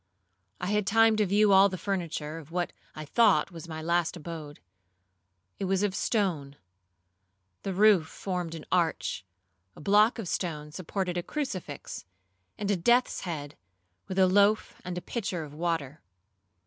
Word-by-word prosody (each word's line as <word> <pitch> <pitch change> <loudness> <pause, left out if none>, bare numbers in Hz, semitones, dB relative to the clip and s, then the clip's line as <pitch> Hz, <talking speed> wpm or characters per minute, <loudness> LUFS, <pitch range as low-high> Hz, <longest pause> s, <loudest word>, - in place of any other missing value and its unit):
I - - -3
had 210 -2 +1
time 225 +1 +5
to 210 -2 +2
view 205 +2 +4
all 195 +1 +7
the 185 - -5
furniture 165 -5 -3
of 155 -2 -13
what 175 +1 -2 0.2
I 155 - -6
thought 230 +3 +3 0.2
my 160 0 -6
last 170 +1 +1
abode. 155 -3 -8 1.0
It 195 - -1
was 190 +1 +1
of 205 -2 +1
stone; 175 - -1 1.1
the 195 - -3
roof 195 -4 +5
formed 180 -3 -4
an 160 - -9
arch; 170 - 0 0.5
a - - -13
block 210 +8 +4
of 220 -5 -5
stone 150 -4 -3
supported 180 +1 -3
a - - -1
crucifix, 185 - -5 0.5
and 205 -1 -1
a - - +3
death's 240 +8 +2
head, 150 -5 -5 0.5
with 190 - -5
a 190 - +6
loaf 200 +3 +3
and 180 0 -5
a - - -3
pitcher 195 -8 -3
of 145 -2 -10
water. 155 -3 -2
180 Hz, 155 wpm, -28 LUFS, 160-200 Hz, 1.1 s, all